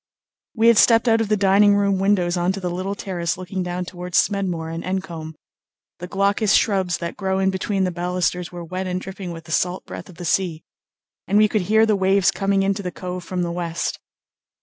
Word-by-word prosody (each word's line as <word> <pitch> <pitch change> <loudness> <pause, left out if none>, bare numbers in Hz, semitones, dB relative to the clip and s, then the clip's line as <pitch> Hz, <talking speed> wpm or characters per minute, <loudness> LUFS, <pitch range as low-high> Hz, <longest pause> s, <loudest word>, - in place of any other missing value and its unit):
We 225 0 +3
had 235 - +5
stepped 230 +1 +5
out 225 0 +4
of 225 - -1
the 215 - +2
dining 200 +1 +5
room 200 -1 +1
windows 190 -3 +2
on 175 +1 +1
to 195 - -5
the 180 -2 -3
little 185 +3 -3
terrace 175 -4 -3
looking 185 +1 -4
down 180 0 -3
towards 180 0 -4
Smedmore 180 -5 0
and 165 - -5
Encombe. 170 -4 -4 0.6
The 180 - -6
glaucous 200 +2 +2
shrubs 190 -4 +2
that 170 -1 -5
grow 190 -1 -1
in 190 0 +2
between 195 +1 -1
the 185 - 0
balusters 180 0 -2
were 175 -1 -7
wet 185 +2 -4
and 180 0 -2
dripping 190 0 -7
with 165 -1 -8
the 165 - -11
salt 180 +3 0
breath - - -9
of 180 - -13
the 175 - -8
sea, 170 -2 0 0.6
and 200 - +2
we 215 0 +6
could 210 0 0
hear 220 +1 +5
the 215 -1 +2
waves 195 0 +3
coming 195 0 0
into 195 +1 0
the 180 - -3
cove 180 0 -6
from 180 +1 -3
the 170 - -2
west. 170 -1 -3
185 Hz, 215 wpm, -22 LUFS, 175-200 Hz, 0.6 s, we